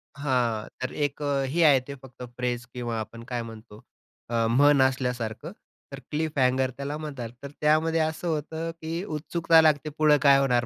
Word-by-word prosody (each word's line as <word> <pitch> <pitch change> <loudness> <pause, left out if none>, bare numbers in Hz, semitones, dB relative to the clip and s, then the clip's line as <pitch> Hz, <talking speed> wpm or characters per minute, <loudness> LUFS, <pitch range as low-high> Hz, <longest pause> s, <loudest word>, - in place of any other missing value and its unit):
हां. 125 -6 0
तर 130 - -3
एक 145 0 -2
अ, 140 -2 0
हे 170 +1 +3
आहे 145 -4 +6
ते 140 - -6
फक्त 130 -1 -13
फ्रेज 120 -1 -2
किंवा 120 -2 -3
आपण 110 +2 -7
काय 120 - -1
म्हणतो 110 -1 -12 0.5
अ, 115 -1 +1
म्हण 140 +3 +5
असल्यासारखं, 125 +1 -1 0.4
तर 135 - -7
क्लिफ 155 0 -2
हँगर 130 0 +2
त्याला 140 +2 -4
म्हणतात. 140 -7 -6
तर 140 - -6
त्यामध्ये 155 +2 +3
असं 160 +2 -2
होतं 160 +1 -3
की 165 +3 -3
उत्सुकता 165 0 +2
लागते 155 -1 +2
पुढं 150 -1 +5
काय 140 -2 +6
होणार. 125 -3 +2
140 Hz, 175 wpm, -26 LUFS, 125-155 Hz, 0.5 s, आहे